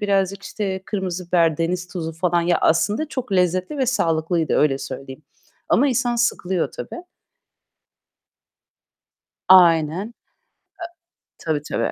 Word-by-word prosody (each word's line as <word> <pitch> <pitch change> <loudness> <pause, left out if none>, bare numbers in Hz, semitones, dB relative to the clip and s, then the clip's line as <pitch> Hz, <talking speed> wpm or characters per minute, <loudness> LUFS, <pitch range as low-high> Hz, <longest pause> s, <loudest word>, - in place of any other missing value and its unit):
birazcık 195 -1 0
işte 190 -3 -4
kırmızı 185 -3 -4
biber, 165 -4 +2
deniz 175 +2 -2
tuzu 165 -3 -5
falan. 175 +1 0
Ya 175 0 +2
aslında 210 - +1
çok 255 -7 -5
lezzetli 185 - 0
ve 260 - +1
sağlıklıydı 165 -7 0
öyle 140 -2 +2
söyleyeyim. 135 +2 -8 0.5
Ama 280 +3 +3
insan 245 -1 0
sıkılıyor 190 -7 0
tabii. 350 - -8 2.5
Aynen. 170 0 +5
E 240 - -26 1.1
tabii, 155 -2 0
tabii. - - -1
180 Hz, 115 wpm, -21 LUFS, 165-205 Hz, 2.5 s, Aynen